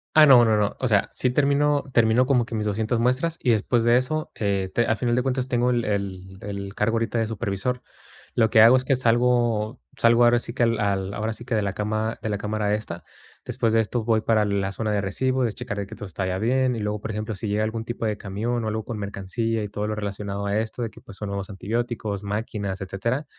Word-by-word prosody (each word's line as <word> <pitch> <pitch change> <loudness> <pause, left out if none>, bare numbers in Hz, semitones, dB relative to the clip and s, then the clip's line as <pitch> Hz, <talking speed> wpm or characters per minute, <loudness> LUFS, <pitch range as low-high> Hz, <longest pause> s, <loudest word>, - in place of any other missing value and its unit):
Ah, 155 -1 +9
no 130 -4 +8
no 110 -1 +3
no. 105 -1 0
O 130 - 0
sea, 105 -4 +2
sí 125 - 0
termino 145 +2 +2
termino 115 +2 +4
como 125 -3 +2
que 115 - -6
mis 105 -1 -1
200 110 +3 0
muestras, 130 +8 +1
y 125 - +3
después 115 +2 +2
de 120 +1 +5
eso, 155 +5 -2
eh, 100 -3 -1
te 120 - +2
a 110 - +2
final 120 +1 0
de 125 - +2
cuentas 130 0 -1
tengo 125 -1 +1
el 120 -2 +1
el 95 -2 -3
el 100 -1 -6
cargo 105 +2 0
ahorita 115 +1 0
de 115 - 0
supervisor. 110 +3 -2 0.5
Lo 110 -2 +3
que 110 - +6
hago 115 +3 +8
es 130 - -2
que 135 - +3
salgo 120 -2 +1 0.2
salgo 115 +1 +5
ahora 120 0 +5
sí 115 - -6
que 120 - +1
al 115 -2 +2
al 100 -2 -1
ahora 110 +2 -2
sí 120 +2 -10
que 125 - -3
de 110 - +2
la 100 -1 -2
cama 110 +2 -2
de 110 - -3
la 105 - -1
cámara 105 0 -1
esta. 85 -6 -4 0.4
Después 115 -1 0
de 115 - +4
esto 115 +1 -1
voy 110 -1 +2
para 110 -1 +2
la 100 -1 -1
zona 110 +2 -2
de 105 -1 +1
recibo, 130 +7 0
de 115 -3 0
checar 120 -4 -5
el 100 - -2
que - - -9
todo - - -7
está 95 0 -4
ya 95 0 -1
bien, 125 +4 +1
y - - -4
luego, 105 0 -2
por 110 - -5
ejemplo, 105 +1 -4
sí 100 +3 -5
llega 105 +1 0
algun 110 +1 -3
tipo 120 -1 -4
de 105 -1 -1
camión 110 +5 -3
o - - -2
algo 110 0 -2
con 115 - -5
mercancía 105 +3 -2
y 105 - -5
todo 105 +1 -3
lo 110 - -2
relacionado 100 -1 -4
a 100 +1 0
esto 110 +2 -4
de 115 - -2
que - - -15
pues, 100 - -13
son 105 - -5
nuevos 100 0 -4
antibióticos, 105 0 -3
máquinas, 100 -2 -3
etcétera, 115 +9 -2
110 Hz, 255 wpm, -24 LUFS, 100-120 Hz, 0.5 s, Ah